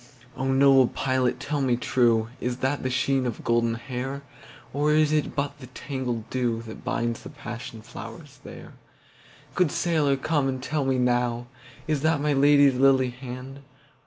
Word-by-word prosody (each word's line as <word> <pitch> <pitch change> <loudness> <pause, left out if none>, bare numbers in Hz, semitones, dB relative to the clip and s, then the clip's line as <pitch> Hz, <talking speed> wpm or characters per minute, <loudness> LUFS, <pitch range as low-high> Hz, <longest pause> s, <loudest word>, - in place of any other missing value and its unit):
O 135 0 -1
noble 135 -1 +6
pilot 130 -1 0
tell 145 +1 -2
me 125 -3 +2
trueIs 120 0 +1
that 135 +2 0
the 130 - -1
sheen 130 +1 +1
of 120 - -5
golden 115 -1 +1
hair? 130 +3 -5 0.5
Or 145 +2 +1
is 155 -1 +3
it 150 -2 0
but 140 0 -2
the 130 - -10
tangled 125 -3 -4
dewThat 115 -3 -3
binds 115 0 -2
the - - -9
passion 120 -5 -8
flowers - - -10
there? - - -11 0.8
Good 180 -5 +2
sailor 150 -5 +1
come 145 0 0
and 130 -1 -3
tell 150 -1 -1
me 135 -1 +1
nowIs 125 +3 -2
that 155 -1 +2
my 150 0 +1
Lady's 140 0 +5
lily 130 -1 +3
hand? 130 +2 -8
130 Hz, 155 wpm, -25 LUFS, 120-140 Hz, 0.8 s, noble